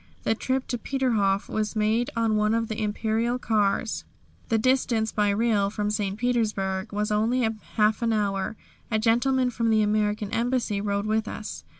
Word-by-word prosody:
The -, -, +2 dB
trip 260 Hz, +3 st, -1 dB
to 245 Hz, -, -2 dB
Peterhof 215 Hz, -7 st, 0 dB
was 215 Hz, 0 st, -2 dB
made 220 Hz, +3 st, +1 dB
on 225 Hz, -2 st, +1 dB
one 210 Hz, +1 st, +2 dB
of 230 Hz, -1 st, -1 dB
the 220 Hz, 0 st, -3 dB
Imperial 220 Hz, +3 st, 0 dB
cars. 215 Hz, -2 st, 0 dB, 0.5 s
The 225 Hz, -, +3 dB
distance 230 Hz, -2 st, +1 dB
by 210 Hz, -1 st, +1 dB
rail 205 Hz, -1 st, +2 dB
from 210 Hz, 0 st, -2 dB
St. 205 Hz, -2 st, -2 dB
Petersburg 215 Hz, -5 st, -1 dB
was 210 Hz, +1 st, -1 dB
only 225 Hz, +3 st, +2 dB, 0.3 s
half 215 Hz, +1 st, +3 dB
an 230 Hz, -1 st, +1 dB
hour. 200 Hz, -1 st, -1 dB, 0.3 s
A 220 Hz, -, +1 dB
gentleman 250 Hz, +3 st, +2 dB
from 230 Hz, -1 st, 0 dB
the 215 Hz, -1 st, +4 dB
American 210 Hz, 0 st, 0 dB
Embassy 235 Hz, -3 st, 0 dB
rode 200 Hz, 0 st, -1 dB
with 220 Hz, 0 st, 0 dB
us. 215 Hz, -, -6 dB
220 Hz, 170 wpm, -26 LUFS, 210-230 Hz, 0.5 s, the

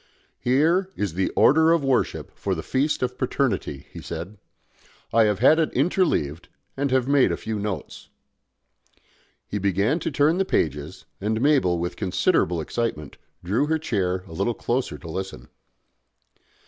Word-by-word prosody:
"Here 160 Hz, +9 st, +2 dB
is 100 Hz, -6 st, -2 dB
the 95 Hz, +2 st, 0 dB
Order 160 Hz, +3 st, +5 dB
of 165 Hz, -3 st, +3 dB
Worship 135 Hz, -2 st, 0 dB
for -, -, -2 dB
the -, -, -5 dB
Feast 140 Hz, +1 st, 0 dB
of 125 Hz, 0 st, -3 dB
Paternity," 120 Hz, -, -1 dB
he -, -, -9 dB
said. 85 Hz, +5 st, -7 dB, 0.7 s
"I 115 Hz, 0 st, +5 dB
have 105 Hz, -2 st, +1 dB
had 140 Hz, -, +5 dB
it 160 Hz, -, +1 dB
interleaved, 130 Hz, -, 0 dB, 0.3 s
and 140 Hz, +1 st, -1 dB
have 130 Hz, -1 st, +1 dB
made 140 Hz, -1 st, +4 dB
a -, -, -1 dB
few 110 Hz, -1 st, -4 dB
notes." 100 Hz, -7 st, -5 dB, 1.4 s
He 105 Hz, -, -3 dB
began 100 Hz, -, +1 dB
to -, -, -2 dB
turn 150 Hz, +4 st, +2 dB
the -, -, +4 dB
pages, 75 Hz, -, -2 dB, 0.2 s
and 110 Hz, +2 st, 0 dB
Mabel, 130 Hz, -, +3 dB
with 85 Hz, +1 st, -3 dB
considerable 90 Hz, -3 st, +1 dB
excitement, 75 Hz, -7 st, -3 dB, 0.3 s
drew 110 Hz, +11 st, +1 dB
her 160 Hz, +1 st, +1 dB
chair 95 Hz, -, -1 dB
a -, -, -11 dB
little 100 Hz, +7 st, -1 dB
closer 120 Hz, -, -2 dB
to 75 Hz, -, -11 dB
listen. 85 Hz, -8 st, -6 dB
110 Hz, 155 wpm, -24 LUFS, 90-140 Hz, 1.4 s, Order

